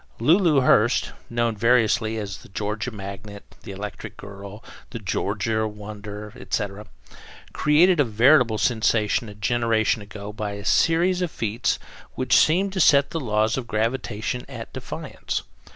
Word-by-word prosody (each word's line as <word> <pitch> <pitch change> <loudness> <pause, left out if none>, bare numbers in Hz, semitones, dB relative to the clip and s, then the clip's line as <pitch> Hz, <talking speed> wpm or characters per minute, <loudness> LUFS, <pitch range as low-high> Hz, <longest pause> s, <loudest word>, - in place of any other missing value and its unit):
Lulu 155 - +4
Hurst 120 -2 +3 0.2
known 115 -1 0
variously 115 0 +2
as 100 -3 -5
The - - -16
Georgia 105 +4 -3
Magnet, 100 -1 -9
The - - -9
Electric 100 +1 -7
Girl, 100 +1 -10 0.3
The 125 - -6
Georgia 110 +1 -1
Wonder, 105 0 -8
etc. 100 0 -4 0.7
created 165 +4 +4
a - - +6
veritable 115 0 +4
sensation 110 -1 +1
a 105 - -10
generation 110 +1 +1
ago 105 0 -8
by 105 -1 -4
a 100 0 -8
series 175 +6 +3
of 180 - 0
feats 115 -3 -1 0.4
which 130 - +2
seemed 190 +5 +3
to 190 - -2
set 140 -4 +5
the 165 - -2
law 110 -6 +1
of 130 -3 -4
gravitation 115 +1 -2
at 115 -4 -8
defiance. - - -5
110 Hz, 140 wpm, -24 LUFS, 105-125 Hz, 0.7 s, a